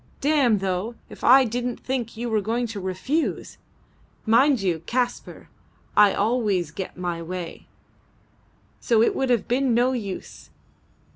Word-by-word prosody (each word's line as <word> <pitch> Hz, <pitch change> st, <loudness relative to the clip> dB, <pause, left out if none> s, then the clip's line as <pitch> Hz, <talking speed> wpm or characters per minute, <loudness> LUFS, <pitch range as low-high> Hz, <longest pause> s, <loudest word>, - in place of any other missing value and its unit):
"Damme, 280 Hz, -7 st, +3 dB
though, 195 Hz, +4 st, -2 dB
if -, -, -13 dB
I 265 Hz, +1 st, +7 dB
didn't 245 Hz, +1 st, -3 dB
think 245 Hz, -4 st, -4 dB
you 240 Hz, +1 st, -3 dB
were 220 Hz, -2 st, +1 dB
going 230 Hz, +4 st, -1 dB
to 225 Hz, -3 st, -6 dB
refuse. 190 Hz, -, -2 dB, 0.7 s
Mind 255 Hz, +4 st, +4 dB
you, 180 Hz, -5 st, -1 dB
Kaspar, 245 Hz, 0 st, -3 dB, 0.5 s
I 205 Hz, -1 st, +6 dB
always 205 Hz, -7 st, 0 dB
get 185 Hz, +3 st, -7 dB
my 175 Hz, -2 st, -3 dB
way, 175 Hz, 0 st, -7 dB, 1.1 s
so 225 Hz, -2 st, +3 dB
it -, -, +1 dB
would 265 Hz, -1 st, -1 dB
have 240 Hz, -4 st, +1 dB
been 250 Hz, -1 st, +1 dB
no 245 Hz, +2 st, +3 dB
use. 205 Hz, -7 st, -6 dB
230 Hz, 140 wpm, -24 LUFS, 195-250 Hz, 1.1 s, I